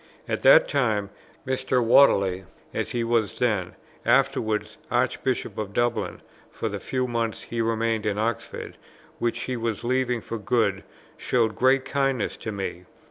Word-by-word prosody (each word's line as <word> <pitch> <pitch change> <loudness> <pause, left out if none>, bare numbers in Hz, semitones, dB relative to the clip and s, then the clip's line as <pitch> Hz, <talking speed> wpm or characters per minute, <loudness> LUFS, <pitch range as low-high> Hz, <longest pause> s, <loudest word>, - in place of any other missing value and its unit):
At - - -2
that - - +7
time, 105 - 0 0.3
Mr. 130 -1 0
Whately, 100 -7 +5 0.3
as - - -2
he 120 -1 -1
was 115 -3 0
then, 105 -7 0 0.3
afterwards 125 -3 +1
Archbishop - - -1
of 100 -2 -4
Dublin, 120 +2 -1 0.3
for - - -4
the - - -4
few 130 -1 -2
months 115 -2 -2
he 115 -1 -3
remained 115 -1 0
in 100 -1 0
Oxford, 110 +1 -3 0.4
which 115 0 -1
he 130 - -3
was 115 -2 -3
leaving 125 0 +1
for 115 0 -6
good, 105 -3 +1 0.3
showed 115 -3 +1
great 130 +1 +3
kindness 135 -5 0
to 110 - -5
me. 95 -3 -5
115 Hz, 145 wpm, -25 LUFS, 105-125 Hz, 0.4 s, that